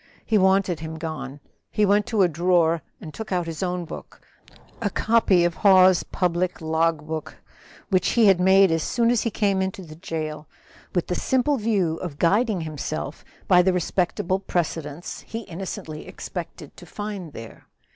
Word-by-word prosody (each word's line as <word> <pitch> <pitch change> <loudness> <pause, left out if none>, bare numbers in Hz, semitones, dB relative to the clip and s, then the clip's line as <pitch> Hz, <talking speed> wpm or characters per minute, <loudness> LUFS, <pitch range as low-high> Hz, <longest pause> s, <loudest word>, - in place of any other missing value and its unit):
He 215 -2 +3
wanted 190 -2 +2
him 160 0 -6
gone. 145 -4 -6 0.3
He 210 - +2
went 205 +2 +3
to 220 -5 +2
a - - +5
drawer 170 0 +2 0.2
and 155 - -9
took 220 -2 -7
out 180 -2 0
his 165 0 -6
own 180 -1 -2
book, - - -10 0.6
a 205 - +1
copy 210 -5 +3
of 175 - +1
Hawes's 185 -2 +6
public 180 0 -1
log 160 -1 0
book, 155 0 -5 0.5
which 185 -2 +2
he 235 -2 +5
had 195 -3 +5
made 190 0 +5
as 165 0 +1
soon 235 +6 +1
as 245 - +2
he 230 - 0
came 200 -3 +1
into 190 0 -3
the 155 -2 -11
jail, 155 -2 -5 0.5
with 175 - +1
the - - -3
simple 260 +8 +1
view 200 -8 0
of 165 -6 -6
guiding 200 +3 +2
himself 155 -1 -5 0.2
by 180 -2 +6
the 185 +1 +2
respectable 180 +1 0
precedents 165 -4 -3
he 225 - -5
innocently 170 -5 -7
expected - - -8
to - - -12
find 205 -7 -6
there. 115 0 -11
180 Hz, 170 wpm, -24 LUFS, 160-195 Hz, 0.6 s, Hawes's